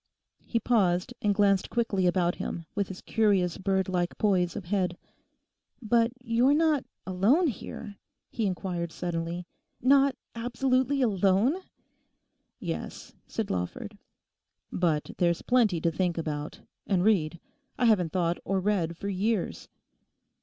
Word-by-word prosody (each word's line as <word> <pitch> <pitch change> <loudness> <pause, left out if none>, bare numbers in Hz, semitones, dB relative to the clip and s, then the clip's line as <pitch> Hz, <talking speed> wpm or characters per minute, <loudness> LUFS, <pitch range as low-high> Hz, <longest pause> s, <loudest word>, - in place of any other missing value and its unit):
He 230 - +1
paused 200 -2 +1
and 205 -1 +2
glanced 195 -2 +3
quickly 205 -6 +1
about 175 -1 +2
him, 170 - -4
with 200 -2 -1
his 190 - -8
curious 200 -6 +1
bird 190 -1 +1
like 180 -2 -1
poise 185 -5 +2
of 190 - -5
head. 180 -1 0 0.8
'But 230 0 +2
you're 245 +4 +3
not 310 -3 +2 0.2
alone 205 - +3
here?' 215 - -5 0.3
he 220 -3 -1
inquired 180 -2 -3
suddenly; 170 +1 -3 0.3
'not 275 +1 +4 0.2
absolutely 255 +3 +1
alone?' 200 - +3 1.0
'Yes,' - - -6
said 220 -3 -3
Lawford. 90 -1 -4 0.8
'But 160 -4 0
there's 170 -1 +2
plenty 230 -9 +3
to 165 - +2
think 175 0 -1
about—and 160 +4 -3
read. 170 -6 +2 0.4
I 245 - +2
haven't 185 -8 +3
thought 175 -2 0
or 195 0 0
read 180 -4 0
for 200 - -5
years. 200 +1 -1
195 Hz, 125 wpm, -28 LUFS, 175-230 Hz, 1.0 s, not